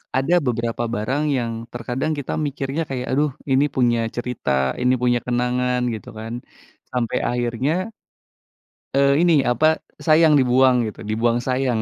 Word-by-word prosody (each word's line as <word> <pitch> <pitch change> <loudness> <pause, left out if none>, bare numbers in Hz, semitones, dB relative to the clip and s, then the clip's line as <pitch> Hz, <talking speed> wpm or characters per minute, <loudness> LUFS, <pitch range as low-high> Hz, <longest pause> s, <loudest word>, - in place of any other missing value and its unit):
Ada 135 +6 +1
beberapa 115 -1 -1
barang 130 +7 -1 0.2
yang 120 -2 -2 0.2
terkadang 125 +5 -2
kita 140 - -5
mikirnya 140 +2 -3
kayak, 125 -2 -4
aduh 145 +2 +1 0.2
ini 135 +2 +4
punya 120 -2 +2 0.2
cerita, 125 0 -4 0.3
ini 125 +1 +3
punya 120 -1 +3
kenangan 125 0 0
gitu 110 - -8
kan. 110 +1 -6 0.6
Sampai 125 -3 -1
akhirnya 120 +3 -1 1.2
eee, 140 +1 +4
ini 165 -5 +4
apa, 155 +6 +2 0.2
sayang 155 -2 +5
dibuang 125 -2 +3
gitu. 110 +1 -8
Dibuang 115 +3 0
sayang. 130 -3 0
125 Hz, 135 wpm, -21 LUFS, 120-135 Hz, 1.2 s, sayang